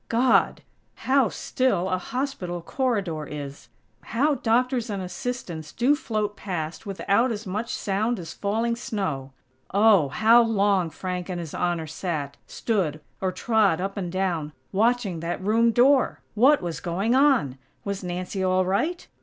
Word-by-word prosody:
God!! 245 +3 +3 0.3
How 265 -2 +2
still 200 -9 0
a 185 -1 0
hospital 185 -7 -4
corridor 195 - -1
is!! 145 -1 -8 0.3
How 290 +6 +1
doctors 245 -1 +1
and 200 -2 -3
assistants 180 -4 -5
do 260 +5 +3
float 215 -8 -2
past 175 -1 -5
without 200 +5 +1
as 220 0 -5
much 210 +5 -3
sound 215 +4 -1
as 170 -3 -7
falling 225 +3 -1
snow! 185 - -3 0.4
Oh! 200 -7 +5
How 225 - +5
long 200 -6 +2
Frank 180 +3 -5
and 180 -1 -3
His 165 -3 -7
Honor 175 -2 -1
sat, 155 -3 -4
stood, 180 -10 -1 0.2
or 190 -1 0
trod 200 -3 +2
up 195 +2 -3
and 180 -4 -4
down, 175 -5 -1 0.2
watching 215 -3 +1
that 170 +2 -3
room 225 +4 +3
door!! 255 +4 +3
What 260 +3 +4
was 170 -3 -3
going 195 +6 -1
on? 260 - +3 0.3
Was 200 -1 -3
Nancy 180 +2 -3
all 185 0 +2
right? 305 - -1
195 Hz, 145 wpm, -25 LUFS, 175-235 Hz, 0.4 s, Oh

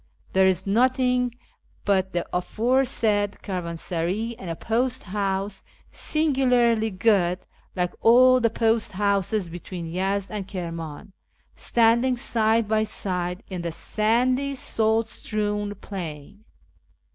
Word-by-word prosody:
There 190 0 +5
is 190 0 +1
nothing 250 +2 +2 0.5
but 190 -2 +2
the 175 -1 -2
aforesaid 215 0 +1
caravansaray 180 +3 -3
and 185 - -7
a 165 - -2
post 245 +6 -1
house 195 0 -2 0.3
(singularly 250 -7 +2
good, 185 -3 +2 0.4
like 180 -1 -1
all 255 +2 +6
the 230 -2 +2
post 225 -1 0
houses 200 0 0
between 175 +1 -7
Yezd 190 +4 -2
and 205 -3 -4
Kirman) 165 -3 -6 0.4
standing 235 +2 +2
side 225 -1 +1
by 215 0 +2
side 180 -2 -3
in 185 -2 -5
the 170 -1 -3
sandy, 250 - 0
salt 225 -3 +1
strewn 205 -2 -2
plain. 190 0 -8
205 Hz, 110 wpm, -24 LUFS, 185-230 Hz, 0.5 s, all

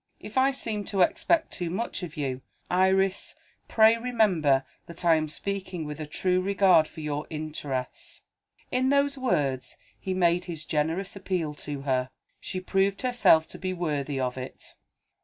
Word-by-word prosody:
If 210 - -10
I 265 +1 +5
seem 225 -6 -3
to 195 -2 +2
expect 325 - +1
too 175 -3 -3
much 205 +6 -2
of 170 -2 -7
you, 135 -3 -2 0.3
Iris, 190 +1 +2 0.3
pray 220 +1 +5
remember 190 - +2 0.2
that 170 +1 -8
I 170 - +6
am 155 -1 +1
speaking 185 0 -4
with 150 +1 -6
a 155 - -5
true 185 +4 +1
regard 190 -4 +4
for 160 - -10
your 150 0 -3
interests." 155 - -5 0.5
In 255 +1 +2
those 280 0 +2
words, 145 - -1 0.2
he 190 -1 -3
made 175 -1 +2
his 160 -3 -5
generous 165 +7 -1
appeal 180 -6 -2 0.2
to 145 -2 -4
her. 130 -2 0 0.3
She 185 - -4
proved 195 +3 0
herself 240 -10 +4
to - - -8
be 185 0 -2
worthy 150 -5 -2
of 130 0 -2
it. 130 - -9
180 Hz, 160 wpm, -27 LUFS, 150-200 Hz, 0.5 s, I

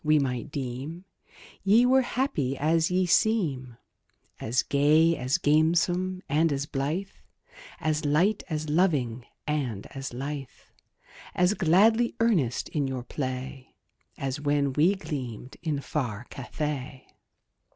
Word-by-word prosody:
we 155 0 +4
might 130 -4 -1
deem 140 +6 -5 0.6
Ye 215 +5 +5
were 260 +1 +5
happy 240 - -1
as 160 +3 +2
ye 185 +1 +2
seem 160 - +1 0.6
As 120 +3 0
gay, 155 +4 +4
as 130 +4 0
gamesome, 175 +4 +2
and 155 +3 +2
as 140 0 -1
blithe, 155 +7 -2 0.7
As 155 -1 -1
light, 170 +9 +2
as 155 -1 -3
loving, 145 -8 +1 0.2
and 130 -9 -2
as 135 -1 -6
lithe, 135 +2 -4 0.9
As 180 +2 +3
gladly 215 +6 +3
earnest 180 - +1
in 145 -3 -1
your 130 -2 -4
play, 130 0 -5 0.4
As 135 +1 -3
when 145 -2 +1
ye 170 +7 +4
gleamed 135 - -6
in 155 -4 -1
far 125 -7 -3
Cathay. 135 -1 -5
150 Hz, 120 wpm, -27 LUFS, 135-175 Hz, 0.9 s, Ye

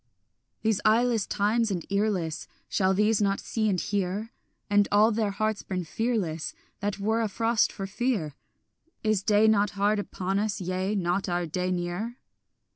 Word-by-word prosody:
These 220 -3 +1
eyeless 225 0 +3
times 215 +3 +1
and 180 -4 -3
earless, 200 -6 0 0.2
Shall 190 0 +2
these 210 +1 +3
not 200 -1 +1
see 215 -2 -1
and 185 -3 +1
hear, 205 +4 -2 0.4
And 205 -1 +3
all 210 +2 +5
their 215 -1 0
hearts 215 +1 -1
burn 180 -2 -4
fearless 190 -6 -2 0.2
That 205 -1 -2
were 220 +3 0
afrost 225 +1 +1
for 195 - -5
fear? 200 - -1 0.7
Is 215 -3 +2
day 210 +1 +4
not 210 -1 +4
hard 205 +1 +2
upon 195 -1 -2
us, 210 0 -1
yea, 185 +2 -1
not 185 0 0
our 175 0 0
day 180 +3 -2
near? 180 +7 -3
205 Hz, 155 wpm, -27 LUFS, 185-220 Hz, 0.7 s, all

